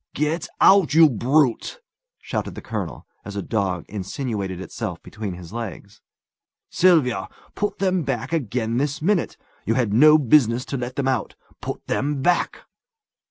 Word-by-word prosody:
"Get 150 +3 -1
out, 190 -7 +5
you 165 0 +8
brute!" 135 - +1 0.4
shouted - - -4
the - - -7
colonel, - - -5 0.2
as 100 - -8
a 100 - -3
dog 95 -5 -1
insinuated 100 -2 -4
itself 95 - -5
between 105 -3 -6
his 90 +1 -11
legs. 105 -3 -7 0.7
"Sylvia, 125 - +3 0.3
put 205 0 -2
them 185 -2 +1
back 125 0 -3
again 120 -5 -1
this 140 +1 -1
minute! 185 +3 0 0.3
You 115 - 0
had 120 -5 +1
no 150 +6 +7
business 125 -3 +3
to - - 0
let 125 +1 -5
them 140 -1 -1
out. 130 -5 -1 0.3
Put - - -6
them 140 -1 -1
back!" 180 +2 +1
125 Hz, 150 wpm, -23 LUFS, 105-155 Hz, 0.7 s, you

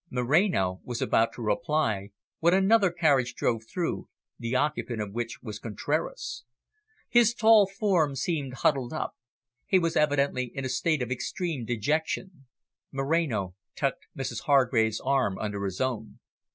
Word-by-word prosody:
Moreno 125 - +1
was 120 -1 -4
about 115 0 +2
to 120 - -7
reply 105 -2 0 0.3
when 170 +2 +4
another 195 +1 +4
carriage 140 -8 +2
drove 115 -2 0
through, 175 -3 -2 0.3
the 115 +1 -2
occupant 130 -4 -1
of 105 -2 -4
which 120 0 -4
was 105 -3 -6
Contraras. 120 +1 -3 0.6
His 235 -1 +4
tall 220 -3 +6
form 190 -8 +1
seemed 140 -2 -2
huddled 135 -4 +2
up; 155 - -3 0.5
he 190 - +4
was 165 -2 0
evidently 140 -4 +1
in 135 - -3
a - - -2
state 140 +2 +1
of 125 - -6
extreme 150 +1 -3
dejection. 150 - -2 0.4
Moreno 135 - 0 0.2
tucked - - -2
Mrs 125 -4 -3
Hargrave's 120 -6 +3
arm 130 -8 +1
under 105 -2 -3
his 95 -1 -4
own. 120 -4 -2
135 Hz, 140 wpm, -27 LUFS, 115-165 Hz, 0.6 s, tall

